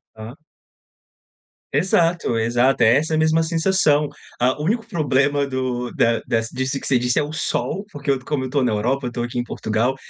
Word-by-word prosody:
Hã. 110 +4 -9 1.4
Exato, 165 -5 +1
exato, 120 +3 +2
é 115 +4 +6
essa 155 +2 -1
a 155 - +2
mesma 160 +1 +3
sensação. 160 -3 +2 0.3
Ah, 130 +4 +1
o - - -2
único 225 +4 0
problema 145 - +1
do 130 -2 -2
da 115 0 +2
dessa 115 0 -1
disso 130 +2 -2
que - - -8
você 130 -3 +2
disse 125 0 0
é 150 - +3
o 150 - -6
sol, 190 +5 -2
porque 140 -1 -2
como 130 +1 -3
eu - - -3
estou 140 +1 0
na 120 -4 +1
Europa, 125 +5 -1
eu - - 0
estou 120 0 -3
aqui 120 +1 -3
em 120 - 0
Portugal, 115 +4 -1
135 Hz, 195 wpm, -21 LUFS, 120-155 Hz, 1.4 s, é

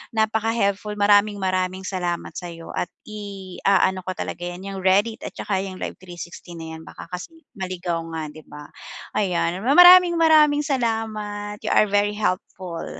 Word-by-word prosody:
Napaka-helpful, 220 -2 0
maraming-maraming 190 -2 +2
salamat 175 -2 -3
sa'yo 170 -2 -8
at 175 - -1 0.2
iaano 195 -2 -1
ko 185 - -2
talaga 175 - -5
'yan, 175 +2 -7
'yang 195 -1 -5
Reddit 205 +5 +2
at - - -6
tsaka 195 -2 -2
'yung 190 -1 -7
live - - -4
360 175 -1 -10
na 160 0 -7
yan - - -12
baka - - -10
kasi 185 - -7 0.2
maligaw 180 -2 -3
nga, 160 - -3
'di 155 - -12
ba, 150 0 -10 0.5
ayan. 180 -2 0
Maraming-maraming 325 -1 +7
salamat! 215 -5 -2
You - - 0
are 215 - +5
very 205 +1 +1
helpful. 185 -4 -3
195 Hz, 145 wpm, -23 LUFS, 180-215 Hz, 0.5 s, Maraming-maraming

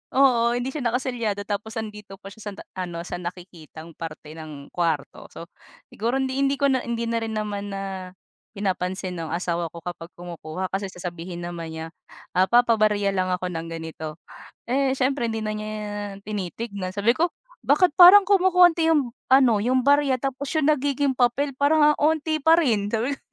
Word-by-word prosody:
Oo, 240 -3 +4
hindi 245 +2 -2
siya 305 - -5
nakaselyado 235 -4 -2
tapos 210 +2 -4
'andito 210 -3 -7
pa 195 0 -12
siya 220 - -15
san 200 - -5
ta - - -10 0.2
ano, 170 -2 -4
sa 180 - -6
nakikitang 170 -2 -9
parte 155 -1 -8
ng 150 -3 -10
kwarto. 165 -5 -2
So, 170 - -11 0.4
siguro 235 +5 -1
hindi 265 0 -1
hindi 275 0 +2
ko 280 -1 +2
na 260 - +2
hindi 235 -1 -3
na 230 0 -1
rin 225 -1 -4
naman 205 -1 -3
na 195 - -4 0.7
pinapansin 185 -2 -2
no'ng 165 0 -3
asawa 170 -1 -2
ko 170 +1 -12
kapag 170 -1 -6
kumukuha, 175 +1 -6
kasi 195 +1 -2
sasabihin 175 -1 -7
naman 170 -2 -6
niya, 160 0 -5 0.5
ah, 185 +1 +3
"Papabarya 215 -3 +3
lang 185 -1 0
ako 180 0 -4
ng 165 0 -5
ganito." 160 -2 -6 0.5
Eh, 265 +2 +1
siyempre 260 -2 0
hindi 225 -1 -3
na 215 - -2
niya 215 0 -5 0.5
tinitignan. 200 -1 -5
Sabi 205 +3 +3
ko, 330 +8 +1 0.4
"Bakit 365 -4 +4
parang 380 +3 +10
kumokonti 360 -4 +4
'yong 290 -7 +2 0.2
ano, 255 -5 +5
'yong 250 +3 +1
barya 285 -1 +4
tapos 270 +2 -3
'yong 305 -1 +4
nagiging 280 -2 0
papel 255 +4 +2
parang 300 +2 +4
ang - - -9
'onti 310 +1 +1
pa 320 +3 +5
rin," 225 -11 +1
sabi 230 +5 0
ko. - - -25
215 Hz, 175 wpm, -24 LUFS, 180-265 Hz, 0.7 s, parang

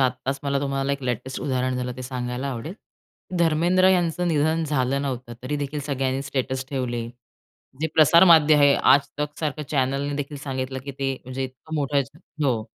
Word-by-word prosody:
आत्ताच 130 +1 0
मला 140 -1 0
तुम्हाला 135 0 -1
एक 140 -1 -4
लेटेस्ट 125 +1 -3
उदाहरण 130 -2 -1
झालं 125 0 -3
ते 130 - -6
सांगायला 125 +1 -4
आवडेल. 130 +8 -6 0.6
धर्मेंद्र 170 +3 +3
यांचं 180 -1 +1
निधन 160 +1 +1
झालं 140 -2 0
नव्हतं. 125 -3 -4
तरी 145 +3 -2
देखील 145 +1 -3
सगळ्यांनी 135 -1 -1
स्टेटस 130 -1 -2
ठेवले. 120 -4 -2 0.7
जे 160 - +1
प्रसार 165 +3 +7
माध्य 160 -4 +7
आहे, 145 -1 +6
आजतक 145 +1 +2
सारखं 150 -1 -2
चॅनलने 140 +1 0
देखील 145 0 -4
सांगितलं, 130 -1 -4
की 140 - -5
ते, 135 0 -2
म्हणजे 130 +1 -4
इतकं 130 +5 -9
मोठं 140 -1 +1 0.4
हो. 120 -5 +1
140 Hz, 165 wpm, -24 LUFS, 130-150 Hz, 0.7 s, प्रसार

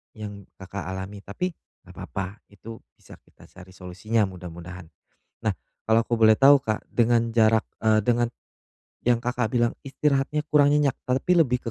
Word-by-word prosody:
yang 105 -2 -9
Kakak 95 -1 -7
alami 95 +2 -6
tapi 100 - -4 0.3
nggak - - -15
papa, 95 +2 -6
itu 110 +3 -11 0.2
bisa - - -16
kita - - -22
cari 95 0 -15
solusinya 95 +5 -1
mudah-mudahan. 90 -2 -8 0.5
Nah, - - -1 0.3
kalau 110 +1 +4
aku 120 0 -2
boleh 110 -1 +6
tahu, 140 +4 +7
Kak, 110 -5 -3
dengan 115 0 +2
jarak 110 -1 +4 0.2
eee, 110 -1 +3
dengan 120 +1 +2 0.8
yang 120 -1 +3
Kakak 120 -1 -2
bilang 120 -1 +2
istirahatnya 140 +1 0
kurang 145 -1 +5
nyenyak, 145 -2 +1
tapi 130 +8 +1
lebih 125 -6 +1
110 Hz, 155 wpm, -25 LUFS, 100-125 Hz, 0.8 s, tahu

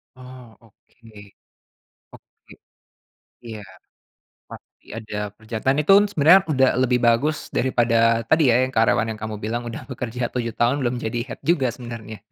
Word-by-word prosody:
Oh 130 0 -13 0.2
oke. 115 +1 -24 1.1
Oke, - - -19 0.9
iya, 110 -2 -8 0.9
pasti - - -15
ada 110 -1 -8 0.2
pekerjaan 110 +4 -2
itu 155 - +2
n - - +2
sebenarnya 175 +2 +5
udah 130 -1 +3
lebih 125 -1 +2
bagus 145 +7 +2 0.2
daripada 120 -2 +1 0.3
tadi 160 0 +4
ya, 115 - +4
yang 130 - -8
karyawan 115 0 +2
yang 110 - -12
kamu 110 -1 -5
bilang 120 +2 -3
udah 115 - -7
bekerja 125 -1 -6
7 115 -2 -3
tahun 120 +3 +2
belum 125 0 -1
jadi 110 +2 -3
head - - -8
juga 135 -7 +2
sebenarnya. 115 -3 -9
120 Hz, 145 wpm, -22 LUFS, 115-130 Hz, 1.1 s, sebenarnya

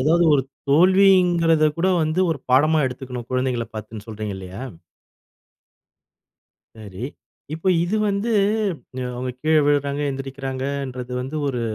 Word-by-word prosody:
அதாவது 165 +5 +3
ஒரு 135 - +2 0.3
தோல்விங்குறத 175 -2 +5
கூட 185 +3 +2
வந்து 155 +4 0
ஒரு 150 - -2
பாடமா 155 +5 +4
எடுத்துக்கணும், 125 -2 -6
குழந்தைகள 125 -2 0
பாத்துன்னு 110 0 -8
சொல்றீங்க 105 -2 -5
இல்லயா? 95 +6 -8 2.1
சரி, 105 0 -8 0.5
இப்ப 160 +3 -8 0.2
இது 180 +5 0
வந்து 200 +4 -1 0.9
அவங்க 125 +1 -3
கீழ 155 0 +3
விழுறாங்க, 145 0 +1
எழுந்திரிக்கிறாங்கன்றது 135 -1 -4
வந்து 135 +5 -5
ஒரு 125 -3 -2
135 Hz, 110 wpm, -22 LUFS, 125-160 Hz, 2.1 s, தோல்விங்குறத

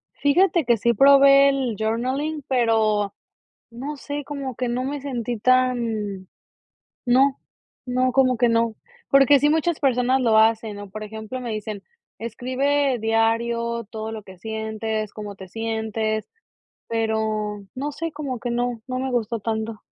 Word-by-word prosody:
Fíjate 340 +2 +3
que 235 -1 +3
sí 235 +2 +1
probé 275 +2 +7
el 260 -6 0
journaling, 260 +8 -1
pero 220 -5 +2 0.6
no 270 +6 -6
sé, 290 +1 -5
como 275 -3 -5
que 250 - -2
no 245 +1 -1
me 285 +1 -3
sentí 245 -4 -3
tan 230 -6 +1 0.8
no, 265 +2 +3 0.5
no, 255 0 +1
como 255 -2 +3
que 240 0 +4
no. 230 -1 +1 0.4
Porque 275 +1 +6
sí 295 +2 +3
muchas 320 +1 +1
personas 260 -1 +2
lo 225 -3 +4
hacen, 220 -1 +2
¿no? 205 0 -8
Por 215 +2 -7
ejemplo, 220 +4 -6
me 240 - -5
dicen: 215 -1 -5 0.4
"Escribe 255 +4 0
diario 230 +1 0
todo 220 0 -5
lo 220 - -6
que 190 -2 -14
sientes, 220 +1 -3
cómo 210 -2 -7
te 190 -1 -11
sientes", 220 0 -2 0.6
pero 220 -2 -1
no 285 +3 -3
sé, 330 +3 -4
como 280 -4 -4
que 245 - -3
no, 240 -1 -1
no 255 -1 -3
me 265 0 -2
gustó 230 -2 -1
tanto. 220 0 -3
235 Hz, 150 wpm, -23 LUFS, 220-265 Hz, 0.8 s, probé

